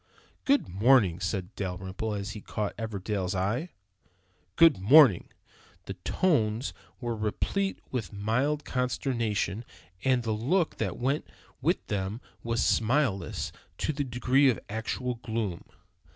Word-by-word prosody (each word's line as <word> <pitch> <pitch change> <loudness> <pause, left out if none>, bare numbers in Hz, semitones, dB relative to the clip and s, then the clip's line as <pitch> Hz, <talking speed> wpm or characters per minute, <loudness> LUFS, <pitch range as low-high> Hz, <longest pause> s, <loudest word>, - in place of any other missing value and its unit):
"Good 280 +1 +3
morning!" 100 -2 +4
said 95 +1 -3
Dalrymple, 95 +3 -4
as 100 0 -4
he 105 - -7
caught 100 -3 -3
Everdell's 100 -3 -3
eye! 110 - -1 0.9
"Good 165 - +6
morning!" 120 - +6 0.6
The 95 - -5
tones 110 - 0 0.3
were 120 -2 -2
replete 155 - -1
with 115 -9 -3
mild 125 +9 0
consternation, 120 -5 -1 0.4
and 130 -2 +2
the 115 - -1
look 150 - +1
that - - -2
went 135 +4 -1 0.3
with - - +1
them 100 +2 -2 0.2
was 115 0 0
smileless 115 -3 +1 0.3
to 155 - -1
the 145 0 -1
degree 130 +2 +3
of 120 - 0
actual 115 +3 -3
gloom. 110 -6 -3
115 Hz, 125 wpm, -28 LUFS, 100-130 Hz, 0.9 s, Good